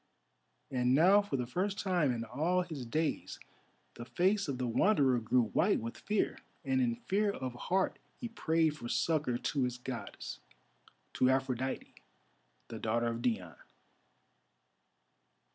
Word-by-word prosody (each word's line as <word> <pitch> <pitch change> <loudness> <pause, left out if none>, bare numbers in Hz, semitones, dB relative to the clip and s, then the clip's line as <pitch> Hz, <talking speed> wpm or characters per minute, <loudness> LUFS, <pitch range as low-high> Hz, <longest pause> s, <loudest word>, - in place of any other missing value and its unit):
And 125 0 +2
now 190 +7 +6
for 200 -9 -3
the 125 - -1
first 190 +10 -2
time 175 -8 +1
in 115 -2 -2
all 160 +10 0
his 150 -8 -7
days 155 +6 -2 0.5
the 120 - -8
face 190 - +1
of 140 -3 -2
the 125 - -1
Wanderer 130 - +3
grew 120 +2 +2
white - - +2
with 115 +1 -5
fear, 210 -1 -1 0.3
and 130 -1 +2
in 120 -2 +1
fear 205 - 0
of 130 -10 -4
heart 185 +10 0 0.2
he 240 - -5
prayed 160 -8 +1
for 120 -5 -7
succour 125 0 +1
to 140 +3 -1
his 125 -1 -1
Goddess—to 125 - -5
Aphrodite, 130 -1 -1 0.8
the 115 - -6
daughter 115 +2 0
of 115 0 -4
Dione. 95 - -2
130 Hz, 140 wpm, -33 LUFS, 120-175 Hz, 0.8 s, now